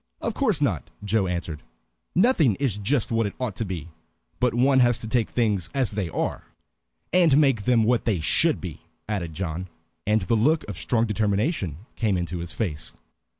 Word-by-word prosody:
"Of -, -, -2 dB
course 215 Hz, -, +1 dB
not," 95 Hz, -, -1 dB
Joe 100 Hz, -1 st, +1 dB
answered. 85 Hz, -4 st, -3 dB, 0.5 s
"Nothing 175 Hz, -, +4 dB
is 130 Hz, -5 st, 0 dB
just 120 Hz, +4 st, 0 dB
what 115 Hz, -2 st, +2 dB
it 100 Hz, -, -7 dB
ought 125 Hz, -6 st, -2 dB
to 115 Hz, -, -2 dB
be. 85 Hz, -4 st, -5 dB, 0.5 s
But 125 Hz, -2 st, +2 dB
one 130 Hz, +2 st, +4 dB
has 120 Hz, -2 st, +4 dB
to 110 Hz, -, -6 dB
take 115 Hz, -1 st, +1 dB
things 105 Hz, -8 st, 0 dB
as 130 Hz, -4 st, +1 dB
they 100 Hz, -4 st, -2 dB
are." -, -, -3 dB, 0.7 s
"And 170 Hz, -6 st, +5 dB
make 135 Hz, -8 st, +3 dB
them 120 Hz, -2 st, +4 dB
what 120 Hz, +2 st, +2 dB
they 105 Hz, -6 st, +1 dB
should 155 Hz, -, +2 dB
be," 85 Hz, -5 st, -7 dB, 0.3 s
added 90 Hz, -7 st, -3 dB
John, 90 Hz, 0 st, -3 dB, 0.4 s
and 105 Hz, -1 st, +3 dB
the 95 Hz, -, 0 dB
look 150 Hz, +9 st, +2 dB
of 105 Hz, -, -5 dB
strong 115 Hz, -2 st, +1 dB
determination 105 Hz, -, -1 dB
came 105 Hz, -5 st, +1 dB
into 85 Hz, 0 st, -3 dB
his 85 Hz, -1 st, -6 dB
face. 85 Hz, -5 st, -4 dB
110 Hz, 185 wpm, -25 LUFS, 90-125 Hz, 0.7 s, And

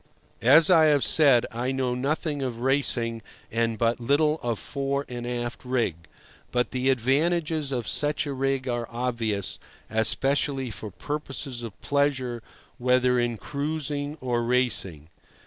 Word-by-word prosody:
As 155 Hz, +8 st, +6 dB
I 160 Hz, -3 st, +7 dB
have 145 Hz, -4 st, +4 dB
said, 125 Hz, +1 st, +5 dB
I 120 Hz, +3 st, -2 dB
know 130 Hz, -2 st, -1 dB
nothing 145 Hz, +3 st, -2 dB
of 120 Hz, -3 st, -4 dB
racing 120 Hz, -4 st, +1 dB, 0.3 s
and 115 Hz, 0 st, 0 dB
but 115 Hz, +1 st, +1 dB
little 150 Hz, +5 st, +2 dB
of 120 Hz, -2 st, -1 dB
fore 140 Hz, +2 st, -3 dB
and 120 Hz, -1 st, -6 dB
aft 120 Hz, -1 st, -4 dB
rig; 125 Hz, -7 st, 0 dB, 0.6 s
but 125 Hz, 0 st, 0 dB
the 130 Hz, +1 st, 0 dB
advantages 150 Hz, +4 st, +1 dB
of 120 Hz, -4 st, -2 dB
such 150 Hz, 0 st, +1 dB
a 145 Hz, -, -3 dB
rig 135 Hz, 0 st, -1 dB
are 120 Hz, -2 st, -2 dB
obvious, 115 Hz, -5 st, -2 dB, 0.3 s
especially 135 Hz, +3 st, +1 dB
for 110 Hz, -, -7 dB
purposes 135 Hz, -, -5 dB
of 115 Hz, -4 st, -8 dB
pleasure, 130 Hz, -4 st, 0 dB, 0.4 s
whether 125 Hz, 0 st, +3 dB
in 120 Hz, -1 st, 0 dB
cruising 145 Hz, +1 st, -3 dB
or 120 Hz, -2 st, 0 dB
racing. 115 Hz, -, 0 dB
130 Hz, 140 wpm, -26 LUFS, 120-145 Hz, 0.6 s, I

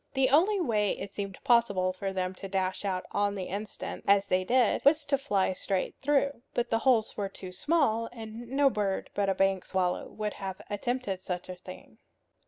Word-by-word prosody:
The 265 Hz, -1 st, +3 dB
only 380 Hz, +8 st, +4 dB
way 215 Hz, -, +1 dB
it 200 Hz, -, -7 dB
seemed 195 Hz, -2 st, -5 dB
possible 200 Hz, -6 st, +3 dB
for 195 Hz, +1 st, -3 dB
them 185 Hz, -1 st, -2 dB
to 195 Hz, +1 st, -8 dB
dash 190 Hz, 0 st, -1 dB
out 185 Hz, -2 st, -1 dB
on 205 Hz, 0 st, +1 dB
the 190 Hz, -, -3 dB
instant, 205 Hz, +4 st, -5 dB
as 200 Hz, 0 st, +5 dB
they 185 Hz, -1 st, +1 dB
did, 245 Hz, +3 st, +2 dB
was 295 Hz, +1 st, +4 dB
to 280 Hz, -, +2 dB
fly 205 Hz, -9 st, +1 dB
straight 190 Hz, 0 st, -2 dB
through. 280 Hz, -2 st, +1 dB
But 240 Hz, -, 0 dB
the 225 Hz, -, +3 dB
holes 230 Hz, -3 st, +2 dB
were 200 Hz, -1 st, -2 dB
too 185 Hz, -1 st, -9 dB
small, 230 Hz, -, +1 dB
and 225 Hz, 0 st, -8 dB
no 275 Hz, +1 st, +3 dB
bird 200 Hz, -3 st, -2 dB
but 200 Hz, -1 st, +1 dB
a 195 Hz, -, +1 dB
bank 195 Hz, -1 st, +2 dB
swallow 180 Hz, -2 st, -1 dB
would 210 Hz, -1 st, -3 dB
have 190 Hz, -1 st, -6 dB
attempted 205 Hz, -2 st, -2 dB
such 180 Hz, -1 st, -4 dB
a 185 Hz, -, -5 dB
thing. 180 Hz, -, -12 dB
205 Hz, 195 wpm, -29 LUFS, 190-245 Hz, -, as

